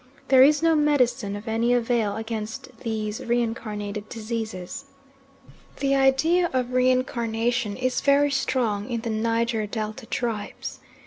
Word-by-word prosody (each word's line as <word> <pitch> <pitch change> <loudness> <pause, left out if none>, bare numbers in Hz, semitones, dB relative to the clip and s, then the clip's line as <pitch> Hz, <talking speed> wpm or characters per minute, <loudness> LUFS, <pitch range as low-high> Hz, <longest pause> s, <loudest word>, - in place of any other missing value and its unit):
There 260 -1 +7
is 295 +3 +5
no 330 0 +5
medicine 265 -9 +2
of 205 +3 -8
any 230 +2 +2
avail 230 -3 +1
against 225 +3 -5
these 215 -2 -3
reincarnated 215 -3 -2
diseases. 220 0 -5 0.9
The 275 -1 +1
idea 275 +6 +3
of 250 -1 -1
reincarnation 240 -3 +1
is 255 0 0
very 285 0 +4
strong 245 -5 0
in 235 -2 -2
the 230 -1 -3
Niger 230 0 0
Delta 220 +2 -5
tribes. 220 -4 -4
235 Hz, 125 wpm, -25 LUFS, 220-260 Hz, 0.9 s, There